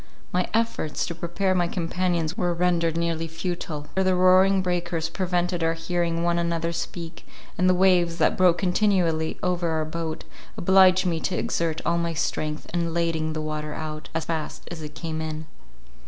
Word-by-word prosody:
My 180 0 +1
efforts 225 -9 0
to 170 - -4
prepare 175 +3 -1
my 175 -2 +2
companions 175 -1 -1
were 175 -1 0
rendered 170 -2 +1
nearly 165 -1 -1
futile 165 -2 -4
—for 190 - +1
the 185 -1 +3
roaring 185 +1 +5
breakers 170 -2 -1
prevented 175 -1 -1
our 165 0 +1
hearing 170 0 -1
one 170 0 +2
another 170 0 -1
speak, 170 0 -6 0.3
and 185 +1 +3
the 185 - +4
waves, 180 -2 +3
that - - +3
broke 180 -2 +4
continually 180 -4 +1
over 175 -2 0
our 160 -1 0
boat, 160 0 -4 0.3
obliged 185 0 +5
me 170 -2 0
to 180 - -2
exert 165 -1 -1
all 170 0 +2
my 170 0 -1
strength 155 -1 -2
in 170 -1 -1
lading 165 -2 0
the 155 - -3
water 155 -1 -4
out, 155 -1 -6
as 165 - -1
fast 160 -2 -4
as 170 -2 -6
it 150 0 -8
came 160 -1 -4
in. 155 0 -4
170 Hz, 175 wpm, -25 LUFS, 160-180 Hz, 0.3 s, roaring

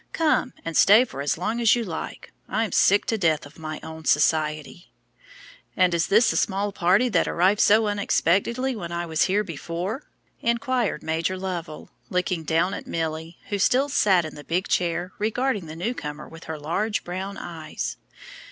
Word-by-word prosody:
"Come 305 -5 +1
and 165 -1 -4
stay 215 +6 +7
for 140 - -7
as 140 +2 0
long 220 +7 -2
as 230 0 +5
you 240 - -1
like. 170 -7 -7 0.2
I'm 220 -3 0
sick 205 +4 +4
to 225 - -1
death 160 -5 +1
of 145 +3 -15
my 155 -1 -5
own 160 0 -9
society." 155 +2 +1 0.9
"And 185 -1 +4
is 165 -1 +1
this 220 +4 +4
the - - -1
small 200 +1 0
party 190 +6 +3
that 180 -7 +2
arrived 190 +4 +2
so 215 +2 +5
unexpectedly 205 +5 +1
when 170 -6 -6
I 170 0 -2
was 160 -1 +1
here 200 +3 +1
before?" 175 - -5 0.3
inquired 235 0 0
Major 165 +4 -1
Lovell, 175 -4 -6 0.2
looking 180 -1 -1
down 165 +4 +1
at - - -7
Milly, 160 +1 -4
who 205 - -1
still 265 +8 +3
sat 195 - +3
in 155 - -7
the 145 - -10
big 175 +5 -1
chair, 175 +1 0
regarding 220 -3 -1
the 155 - -8
new 185 +9 -2
comer 150 -8 -7
with 165 0 -12
her 160 -1 -5
large 180 +9 -2
brown 190 +3 -5
eyes. 160 -3 -5
180 Hz, 180 wpm, -24 LUFS, 160-210 Hz, 0.9 s, stay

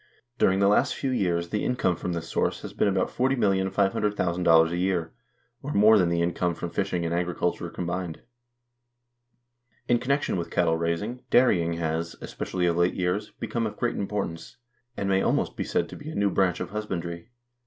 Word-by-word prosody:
During 95 - +4
the 100 0 +3
last 120 +6 +3
few 135 - -2
years 85 -7 0
the 105 - -1
income 125 -8 +1
from 90 +1 -4
this 85 -1 -4
source - - -1
has - - -7
been - - +1
about 95 -2 +1
$40,500,000 95 -7 +2
a 85 - -1
year, 90 -3 -1 0.5
or 145 +2 -4
more 105 +1 +6
than 90 -2 +3
the 85 0 +1
income 85 0 0
from 85 +1 -5
fishing 95 -3 -1
and 85 - -1
agriculture 90 0 -1
combined. 85 -1 -4 1.6
In 120 -1 +3
connection 140 -3 0
with 85 - -3
cattle 85 -2 +2
raising, 85 +9 -2
dairy 120 -8 +5
ing 85 0 -1
has, 85 0 -2
especially 90 -2 -3
of 85 -1 +1
late 85 +1 +2
years, 95 +4 -1
become 115 -2 -1
of 105 - -8
great - - -1
importance, 100 -5 -4 0.4
and 100 - -2
may 95 0 +2
almost - - 0
be - - -2
said - - 0
to - - -8
be 145 - -8
a 160 - -7
new 100 -1 +2
branch 95 -3 +1
of - - -5
husbandry. 90 -3 -4
90 Hz, 185 wpm, -26 LUFS, 85-105 Hz, 1.6 s, more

